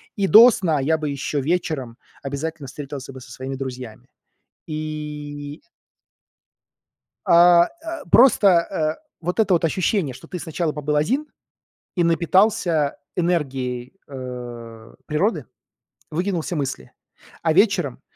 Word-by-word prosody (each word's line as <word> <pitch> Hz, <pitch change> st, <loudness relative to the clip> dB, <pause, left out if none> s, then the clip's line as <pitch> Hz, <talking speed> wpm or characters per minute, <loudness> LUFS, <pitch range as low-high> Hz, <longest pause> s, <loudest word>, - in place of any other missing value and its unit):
И 200 Hz, -, 0 dB
до 230 Hz, +5 st, +9 dB
сна 170 Hz, -9 st, 0 dB
я 155 Hz, +4 st, +1 dB
бы 155 Hz, -1 st, -4 dB
ещё 140 Hz, +1 st, -2 dB
вечером 145 Hz, -6 st, -2 dB, 0.3 s
обязательно 145 Hz, +2 st, -4 dB
встретился 135 Hz, -1 st, -8 dB
бы 130 Hz, -, -10 dB
со 125 Hz, -1 st, -13 dB
своими 130 Hz, +2 st, -6 dB
друзьями. 130 Hz, -4 st, -7 dB, 0.6 s
И 150 Hz, -1 st, -6 dB, 1.6 s
А 170 Hz, 0 st, +7 dB, 0.2 s
а 330 Hz, 0 st, -6 dB
просто, 235 Hz, -5 st, +6 dB
э, 170 Hz, -, +1 dB
вот 180 Hz, +5 st, -3 dB
это 205 Hz, -4 st, +3 dB
вот 170 Hz, -, +2 dB
ощущение, 170 Hz, -, 0 dB
что 130 Hz, -, -13 dB
ты 180 Hz, -, -6 dB
сначала 160 Hz, 0 st, -2 dB
побыл 150 Hz, 0 st, -2 dB
один 260 Hz, -, 0 dB, 0.7 s
и 175 Hz, -, +2 dB
напитался 170 Hz, -2 st, +2 dB, 0.2 s
энергией, 130 Hz, -8 st, -2 dB
э, 120 Hz, -4 st, -8 dB
природы, 175 Hz, +9 st, 0 dB, 0.6 s
выкинул 175 Hz, +2 st, -1 dB
все 175 Hz, -, -4 dB
мысли. 130 Hz, -, -4 dB, 0.5 s
А 160 Hz, -1 st, +2 dB
вечером 180 Hz, -, +2 dB
155 Hz, 120 wpm, -22 LUFS, 135-175 Hz, 1.6 s, до